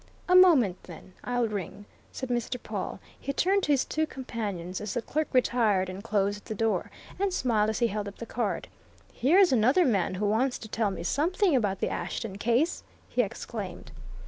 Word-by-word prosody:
"A 365 - +3
moment, 290 - +6
then 180 +1 -12
I'll 245 -1 0
ring," 205 -1 -5 0.3
said 260 - -6
Mr. 240 +1 -1
Pawle. - - -5 0.2
He 275 - -3
turned 390 +7 +2
to 295 - 0
his 275 -3 +3
two 315 0 -1
companions 205 - -5
as 210 +1 -4
the 240 - 0
clerk 310 +1 -1
retired 225 -7 +2
and 190 +2 -7
closed 205 -2 0
the 220 - -5
door, 225 +1 0 0.3
and 400 0 +1
smiled 225 -10 +1
as 220 - -1
he 240 - +2
held 210 0 -3
up 200 - -8
the 230 - -6
card. 225 -2 -2 0.5
"Here's 350 +9 +4
another 260 +9 +4
man 195 -7 +1
who 205 +3 -1
wants 240 +5 +1
to 220 - -9
tell 220 -1 0
me 190 -3 -5
something 335 - +2
about 205 -6 0
the - - +1
Ashton 200 -4 -4
case!" 240 +10 +1 0.3
he - - +2
exclaimed. 470 0 -6
230 Hz, 190 wpm, -28 LUFS, 205-275 Hz, 0.5 s, moment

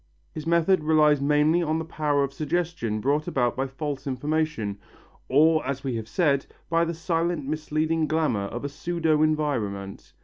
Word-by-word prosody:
His 155 +1 -7
method 170 +1 +3
relies 150 -2 +4
mainly 150 +4 +3
on 160 -1 0
the 160 - -3
power 150 -3 0
of 140 0 -3
suggestion 155 -8 -2
brought 145 +6 0
about 125 -8 0
by 135 +1 -1
false 140 +1 -5
information 145 -6 -1 0.5
or, 155 +4 +4
as 135 +1 -3
we 135 -2 -2
have 110 -1 -6
said, 140 -2 +1 0.2
by 165 0 +3
the 170 0 -3
silent 165 -2 -1
misleading 155 +2 -1
glamour 155 -11 0
of 120 +7 -5
a - - -2
pseudo 160 +1 0
environment. 120 -11 -1
150 Hz, 165 wpm, -25 LUFS, 135-160 Hz, 0.5 s, relies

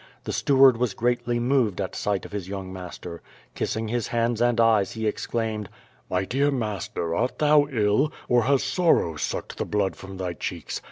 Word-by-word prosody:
The - - -4
steward 135 -3 +5
was 120 -4 -1
greatly 120 0 0
.moved 120 -6 +1
at 95 -2 -3
sight 100 -2 -1
of - - -10
his 100 -3 -5
young 95 -1 -6
master. 90 -2 -8 0.3
Kissing 110 0 -2
his 120 +1 -1
hands 115 0 0
and 120 -1 +2
eyes, 110 -4 +3
he 110 -1 -4
exclaimed: 110 -1 -2 0.4
"l^fy 95 +1 0
dear 140 +3 +2
master, 105 -9 -2
art 125 +8 -1
thou 150 -1 +4
ill, 115 +4 +2 0.2
or 120 -2 +3
has 140 0 +3
sorrow 165 - +2
sucked 75 - -4
the - - 0
blood 100 -2 0
from 95 0 -10
thv 90 -3 -4
cheeks? 85 -4 -4
110 Hz, 180 wpm, -25 LUFS, 95-125 Hz, 0.4 s, steward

